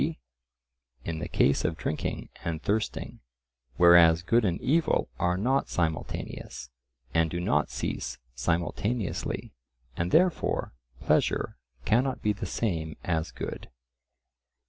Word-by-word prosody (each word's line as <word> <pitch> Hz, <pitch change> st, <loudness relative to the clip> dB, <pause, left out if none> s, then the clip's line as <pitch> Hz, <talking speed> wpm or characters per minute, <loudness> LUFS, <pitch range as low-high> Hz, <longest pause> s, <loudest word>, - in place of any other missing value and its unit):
g. -, -, 0 dB, 0.9 s
in 80 Hz, -1 st, -3 dB
the -, -, -4 dB
case 70 Hz, -, +2 dB
of 80 Hz, -, -1 dB
drinking 75 Hz, -, -3 dB, 0.2 s
and 80 Hz, -1 st, -3 dB
thirsting, 105 Hz, +1 st, -2 dB, 0.6 s
whereas 85 Hz, -1 st, +7 dB
good 115 Hz, +5 st, +3 dB
and 90 Hz, -4 st, 0 dB
evil 155 Hz, -, +2 dB
are 90 Hz, 0 st, +1 dB
not 130 Hz, +7 st, +1 dB
simultaneous, 80 Hz, -6 st, -3 dB, 0.4 s
and 80 Hz, 0 st, +3 dB
do 85 Hz, -, -3 dB
not 90 Hz, -, +1 dB
cease 60 Hz, -, -3 dB, 0.2 s
simultaneously, 85 Hz, -, -2 dB, 0.4 s
and 85 Hz, +3 st, -1 dB
therefore 175 Hz, -, +2 dB, 0.3 s
pleasure -, -, +1 dB, 0.3 s
cannot 130 Hz, +4 st, +2 dB
be 105 Hz, -, +2 dB
the 100 Hz, -1 st, -5 dB
same 80 Hz, -7 st, -2 dB
as 80 Hz, -2 st, -1 dB
good. -, -, -6 dB
85 Hz, 120 wpm, -28 LUFS, 80-110 Hz, 0.9 s, whereas